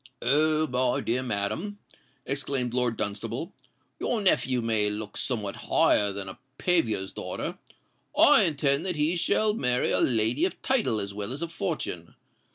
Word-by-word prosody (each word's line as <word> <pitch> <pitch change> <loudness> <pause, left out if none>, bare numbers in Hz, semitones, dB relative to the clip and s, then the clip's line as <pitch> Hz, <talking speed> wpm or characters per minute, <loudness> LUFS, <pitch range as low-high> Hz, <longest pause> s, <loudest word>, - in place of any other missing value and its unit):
"Oh! 155 +4 +2
my 125 -3 0
dear 125 +3 -1
madam," 130 - -3 0.5
exclaimed 135 -3 -1
Lord 125 -2 0
Dunstable, 115 - -3 0.5
"your 235 - 0
nephew 130 -10 +1
may 110 -2 +2
look 105 0 -6
somewhat 105 -6 -2
higher 105 -1 +3
than 100 -1 -6
a 95 - -9 0.2
paviour's 115 - 0
daughter. - - -5 0.6
I - - +7
intend 140 -2 +2
that 180 - -2
he 155 +3 0
shall 210 +5 +1
marry 125 - +2
a - - +2
lady 120 +4 +1
of 190 - -4
title 230 - +1
as 100 -1 -5
well 105 +3 -5
as 140 +5 -4
of 170 - -5
fortune. 100 - -4
125 Hz, 155 wpm, -26 LUFS, 110-155 Hz, 0.6 s, I